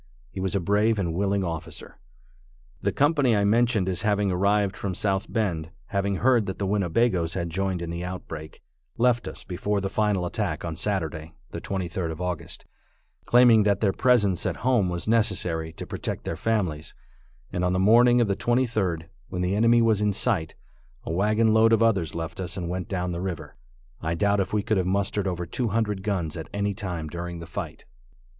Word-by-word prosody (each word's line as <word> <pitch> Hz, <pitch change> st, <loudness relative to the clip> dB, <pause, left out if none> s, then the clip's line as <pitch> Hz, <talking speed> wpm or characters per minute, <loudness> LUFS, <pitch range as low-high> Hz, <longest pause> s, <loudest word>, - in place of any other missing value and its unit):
He -, -, -7 dB
was 95 Hz, +1 st, -1 dB
a -, -, +3 dB
brave 105 Hz, +5 st, +2 dB
and 85 Hz, -5 st, -1 dB
willing 100 Hz, +2 st, 0 dB
officer. 85 Hz, -2 st, -6 dB, 0.8 s
The -, -, +1 dB
company 145 Hz, -5 st, +3 dB
I 100 Hz, -, +2 dB
mentioned 115 Hz, -2 st, +2 dB
as 90 Hz, -2 st, -1 dB
having 105 Hz, -1 st, +1 dB
arrived 100 Hz, +2 st, +2 dB
from 95 Hz, -3 st, -4 dB
South 95 Hz, 0 st, -1 dB
Bend, 85 Hz, -8 st, -1 dB, 0.2 s
having 100 Hz, 0 st, 0 dB
heard 120 Hz, 0 st, +3 dB
that 95 Hz, -, -4 dB
the 100 Hz, -, -2 dB
Winnebagoes 95 Hz, -2 st, +1 dB
had 85 Hz, -3 st, -2 dB
joined 95 Hz, 0 st, -1 dB
in 85 Hz, -, -4 dB
the 85 Hz, +1 st, -4 dB
outbreak, 80 Hz, -4 st, -7 dB, 0.3 s
left 120 Hz, -3 st, +2 dB
us -, -, -6 dB
before 100 Hz, +3 st, -2 dB
the 95 Hz, 0 st, -3 dB
final 105 Hz, -4 st, +1 dB
attack 90 Hz, -3 st, -2 dB
on 80 Hz, -1 st, -3 dB
Saturday, 80 Hz, -4 st, -2 dB, 0.2 s
the -, -, -6 dB
23d 90 Hz, -2 st, -3 dB
of 80 Hz, 0 st, -6 dB
August, 90 Hz, -3 st, -4 dB, 0.6 s
claiming 120 Hz, -2 st, +6 dB
that 100 Hz, -1 st, +2 dB
their 100 Hz, -3 st, +2 dB
presence 105 Hz, -8 st, +3 dB
at -, -, -1 dB
home 120 Hz, -8 st, +3 dB
was 85 Hz, +2 st, -4 dB
necessary 90 Hz, -8 st, +1 dB
to -, -, -7 dB
protect -, -, -4 dB
their -, -, -3 dB
families, 90 Hz, -9 st, -1 dB, 0.6 s
and 90 Hz, -, -1 dB
on 90 Hz, -, +2 dB
the 95 Hz, -, +1 dB
morning 120 Hz, +5 st, +5 dB
of 120 Hz, -, +3 dB
the 100 Hz, -, +1 dB
23d, 110 Hz, -10 st, 0 dB, 0.3 s
when 90 Hz, 0 st, -2 dB
the 90 Hz, +2 st, 0 dB
enemy 115 Hz, +2 st, +4 dB
was 110 Hz, -2 st, +3 dB
in 105 Hz, 0 st, +2 dB
sight, 95 Hz, -7 st, 0 dB, 0.5 s
a -, -, -4 dB
wagon 110 Hz, +4 st, +3 dB
load 110 Hz, +1 st, +5 dB
of 115 Hz, 0 st, +4 dB
others 95 Hz, -9 st, +1 dB
left 85 Hz, +1 st, -5 dB
us 90 Hz, +1 st, -4 dB
and 85 Hz, -2 st, -3 dB
went 90 Hz, 0 st, -3 dB
down 90 Hz, -2 st, -2 dB
the 85 Hz, 0 st, -3 dB
river. 90 Hz, -4 st, -5 dB, 0.5 s
I 80 Hz, +1 st, -1 dB
doubt 100 Hz, +2 st, +2 dB
if 95 Hz, -, -1 dB
we 105 Hz, -1 st, 0 dB
could 110 Hz, -, +1 dB
have 90 Hz, -1 st, 0 dB
mustered 100 Hz, +1 st, 0 dB
over 90 Hz, -1 st, -2 dB
two 120 Hz, +8 st, -2 dB
hundred 105 Hz, -2 st, -1 dB
guns 95 Hz, -6 st, -2 dB
at 80 Hz, -, -7 dB
any 100 Hz, 0 st, -1 dB
time 90 Hz, -5 st, -4 dB
during 85 Hz, +2 st, -5 dB
the 85 Hz, -, -8 dB
fight. -, -, -6 dB
95 Hz, 195 wpm, -25 LUFS, 85-105 Hz, 0.8 s, claiming